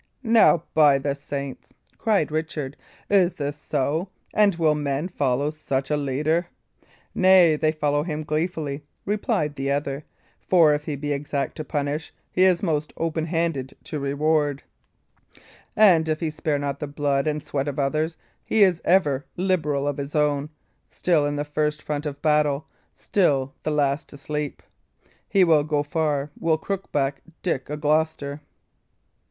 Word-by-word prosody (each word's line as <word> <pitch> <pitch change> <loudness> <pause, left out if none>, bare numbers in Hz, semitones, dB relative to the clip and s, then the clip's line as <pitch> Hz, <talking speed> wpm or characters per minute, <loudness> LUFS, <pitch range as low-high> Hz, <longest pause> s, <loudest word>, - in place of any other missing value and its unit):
"Now, 225 -8 +5
by 150 -3 +6
the 140 +1 -1
saints!" 140 -1 -7 0.2
cried 205 -9 +1
Richard, 155 -3 -3 0.3
"is 190 -3 +3
this 145 0 -3
so? 150 +4 -1 0.2
And 205 -3 +4
will 160 -2 +3
men 145 +1 -1
follow 140 -4 0
such 135 -3 -3
a - - +3
leader?" 150 +5 0 0.7
"Nay, 185 -4 +6
they 155 +1 +1
follow 145 -2 0
him 155 -1 -3
gleefully," 155 -2 -2 0.2
replied 175 -7 -1
the 135 0 -2
other; 140 0 -1 0.4
"for 165 -5 +4
if 150 0 -2
he 150 - -2
be 145 +1 -2
exact 140 0 -3
to 155 - -3
punish, 145 +1 -3 0.2
he 185 - 0
is 185 -1 +3
most 155 -4 -1
open 160 -1 -1
handed 165 -6 -2
to 150 - -5
reward. 145 0 0 1.1
And 175 -7 +5
if 155 0 0
he 160 -2 -2
spare 150 -1 -1
not 140 -1 -3
the 150 - -4
blood 140 -1 0
and 150 -1 -1
sweat 140 0 -2
of 145 0 -3
others, 155 +4 0 0.3
he 220 - +3
is 180 -4 +3
ever 145 -7 +2
liberal 155 -7 0
of 145 - -1
his 140 +1 -5
own, 150 -1 +1 0.4
still 160 -5 +1
in 145 - -2
the 145 0 -2
first 150 0 -1
front 150 0 -3
of 140 -1 -7
battle, 150 -1 +2 0.3
still 140 -9 +1
the - - -2
last 145 -1 0
to 140 - -11
sleep. 150 0 -4 0.7
He 195 - +4
will 160 -4 +4
go 150 -1 0
far, 150 -2 -1
will 160 -1 +2
Crookback 145 -7 -2 0.2
Dick 140 -8 -1
o' 150 - -3
Gloucester!" 150 -1 0
150 Hz, 160 wpm, -24 LUFS, 140-160 Hz, 1.1 s, by